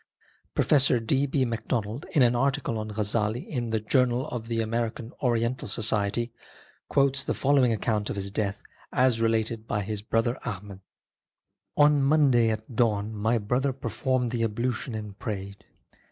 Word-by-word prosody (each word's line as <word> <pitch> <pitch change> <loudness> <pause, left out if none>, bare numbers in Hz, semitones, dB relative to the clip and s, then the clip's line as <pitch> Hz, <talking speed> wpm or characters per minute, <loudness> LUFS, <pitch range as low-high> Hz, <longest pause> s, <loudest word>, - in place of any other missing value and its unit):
Professor 135 -4 +4
D. 135 +5 +1
B. 135 -1 +1
Macdonald, 115 +1 -3
in 145 -7 +5
an 120 0 +3
article 135 -2 0
on 110 0 -4
Ghazzali 105 +2 -1
in 120 -5 -3
the 110 0 0
Jour 125 +4 +3
nal 125 +2 -1
of 115 -2 -5
the 115 -1 -1
American 115 +1 -2
Oriental 120 0 0
Society, 110 +1 0 0.6
quotes 140 0 +2
the - - -2
following 135 -3 +3
account 105 -1 -1
of - - -3
his 100 0 -4
death 100 0 -2 0.3
as 125 -3 +2
related 115 0 0
by 105 0 -1
his 105 0 -3
brother 115 +3 0
Ahmad: 100 -3 -6 0.5
" - - -54
On 145 -1 +5
Monday 135 -5 +4
at 110 +2 -4
dawn 110 -2 +1
my 110 +3 +1
brother 125 +6 0
performed 125 0 -1
the 120 -1 -2
ablution 115 +2 -2
and 105 -2 -7
prayed. 100 -2 -6
115 Hz, 160 wpm, -27 LUFS, 110-125 Hz, 0.6 s, in